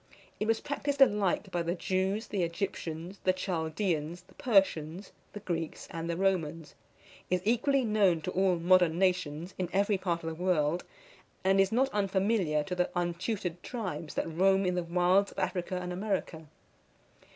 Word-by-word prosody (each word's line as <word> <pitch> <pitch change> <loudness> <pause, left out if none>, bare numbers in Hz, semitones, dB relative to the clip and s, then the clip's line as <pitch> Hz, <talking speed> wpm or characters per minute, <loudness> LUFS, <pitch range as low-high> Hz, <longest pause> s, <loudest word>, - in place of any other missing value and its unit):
It 215 - -1
was 225 0 +2
practised 285 0 -2
alike 205 -6 +3
by 175 - 0
the 170 +1 -1
Jews, 190 +4 -1
the 200 - -1
Egyptians, 170 0 -4
the 185 - +3
Chaldeans, 170 -2 -2
the - - -22
Persians, 190 - +1 0.2
the 210 - -7
Greeks, 165 -5 -4
and 165 0 -4
the 170 - -1
Romans; 165 -5 -1 0.6
is 180 0 0
equally 250 +4 +2
known 205 -6 +3
to 180 - -3
all 185 -1 +2
modern 175 -1 +4
nations, 180 -2 0
in 180 -2 -1
every 200 0 +2
part 170 -3 -1
of 165 - -2
the 165 +2 -6
world; 170 -2 +1 0.6
and 195 +1 +4
is 195 - +2
not 260 +4 +2
unfamiliar 195 - +1
to 180 - -5
the 180 0 0
untutored 175 +1 -2
tribes 185 -10 -5
that - - -1
roam 190 +4 +3
in 180 - +1
the 180 - 0
wilds 180 +3 +2
of - - -27
Africa 185 0 -2
and 180 0 -4
America. 185 -5 -3
185 Hz, 165 wpm, -30 LUFS, 170-195 Hz, 0.6 s, modern